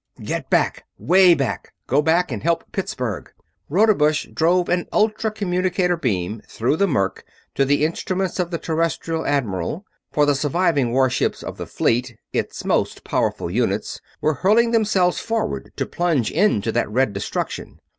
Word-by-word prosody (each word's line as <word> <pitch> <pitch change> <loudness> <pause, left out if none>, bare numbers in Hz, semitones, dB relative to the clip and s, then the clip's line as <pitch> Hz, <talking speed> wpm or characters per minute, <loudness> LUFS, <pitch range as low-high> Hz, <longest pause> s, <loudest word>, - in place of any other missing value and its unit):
"Get - - -4
back - - +1
'way 180 0 +5
back! 135 -5 -3
Go 140 +4 +2
back 165 +2 +2
and 110 - -4
help 170 +1 +1
Pittsburgh!" 125 - -4 0.4
Rodebush 155 -4 +3
drove 175 +2 +2
an 175 0 0
ultra 215 +1 +1
communicator 185 -3 0
beam 105 - -2
through 125 +7 0
the 200 - +3
murk 100 - -1 0.3
to 135 - +2
the 145 +2 +2
instruments 185 +3 -2
of 175 -2 0
the 170 - -2
Terrestrial 165 0 -2
admiral; 135 - -1 0.3
for 150 - +3
the 145 - +3
surviving 145 -2 +1
warships 130 0 +1
of - - -7
the - - -6
fleet 120 0 0 0.2
its - - -3
most - - 0
powerful 85 - -1
units 105 -1 -1 0.2
were 155 - +2
hurling 215 - +3
themselves 205 -6 +2
forward, 225 -1 -3
to - - -2
plunge 165 -9 0
into 130 - +2
that - - 0
red 115 -1 +1
destruction. 100 +1 -4
160 Hz, 155 wpm, -21 LUFS, 125-180 Hz, 0.4 s, way